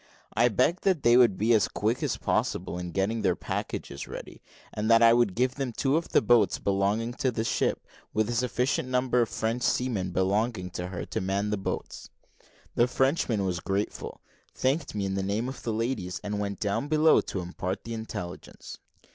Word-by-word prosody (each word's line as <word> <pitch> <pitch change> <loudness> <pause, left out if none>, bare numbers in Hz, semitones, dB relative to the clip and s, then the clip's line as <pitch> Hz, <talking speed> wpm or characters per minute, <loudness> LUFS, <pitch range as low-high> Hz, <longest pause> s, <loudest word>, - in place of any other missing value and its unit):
I 115 +2 +4
begged 130 - +1
that 185 -6 +2
they 120 0 +6
would 120 -6 +5
be 110 +3 +3
as 110 -3 +4
quick - - -1
as - - -1
possible - - -1
in 90 0 -5
getting 100 +6 -1
their 95 -4 +2
packages 70 - -5
ready, - - -9 0.3
and 105 +1 -2
that 115 0 +6
I 115 0 +8
would 120 -5 +2
give 125 +1 +1
them 135 -3 -3
two 135 +5 0
of 165 +1 -1
the - - +3
boats 110 -2 +4
belonging 100 +4 0
to 130 - +2
the 110 -2 -2
ship, - - 0 0.3
with 110 -1 +1
a 120 - -2
sufficient 125 +2 0
number 125 -1 +2
of 115 - 0
French 115 +2 -2
seamen 120 -6 0
belonging 95 +1 0
to 90 0 -4
her 90 -1 -5
to - - -3
man 100 +2 -1
the 105 - 0
boats. 95 - -5 0.6
The 120 - +3
Frenchman 125 -6 +1
was 90 -2 -1
very 100 +2 0
grateful, - - -9 0.3
thanked 135 -1 0
me 100 -1 -1
in 95 - -2
the 95 - -1
name 105 +5 -1
of 130 - -7
the 115 - -2
ladies, 110 -5 -2
and 105 0 -3
went 100 -1 -3
down 105 +7 -1
below 155 +1 +5
to 95 - -5
impart 90 +2 -4
the 115 - -6
intelligence. 110 -6 -7
110 Hz, 200 wpm, -27 LUFS, 95-125 Hz, 0.6 s, I